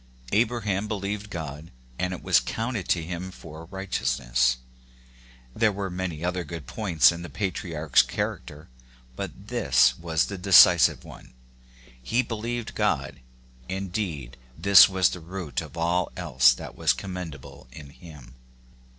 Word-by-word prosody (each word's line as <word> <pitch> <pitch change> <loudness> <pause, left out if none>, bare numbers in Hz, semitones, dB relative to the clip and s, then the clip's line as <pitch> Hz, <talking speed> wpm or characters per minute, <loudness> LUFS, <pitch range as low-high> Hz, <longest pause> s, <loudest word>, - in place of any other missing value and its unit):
" 60 0 -19
Abraham 110 -3 0
believed 105 0 -4
God, 80 -3 -7 0.3
and 90 0 -1
it 90 - -7
^was 85 -9 +3
counted 115 - -3
to 85 - +1
him 90 +2 -5
for 80 -3 -11
righteousness 65 -10 0 0.5
:" 60 0 -26
there 110 -1 +3
were 100 -1 -4
many 90 -3 -4
other 90 0 -2
good 85 -3 -8
points 85 - +3
in 85 - -7
the 85 - -8
patriarch's 85 -7 +1
charac - - -4
ter, 75 +1 -12 0.5
but - - -8
this 60 - +3
was 80 -2 0
the 100 -2 -7
decisive 90 -2 +6
one, - - -14 0.4
— - - -27 0.3
he 115 - 0
believed 115 0 -4
God; - - -1 0.5
indeed, 90 - -4 0.2
this 100 0 +8
was 95 -2 +2
the 90 - -6
root 85 -4 -5
of - - -11
all 85 +2 0
else 65 0 +4
that - - -9
was - - +2
commendable 85 -10 -8
in 70 -2 -11
him. 70 -6 -14
85 Hz, 150 wpm, -25 LUFS, 75-100 Hz, 0.5 s, this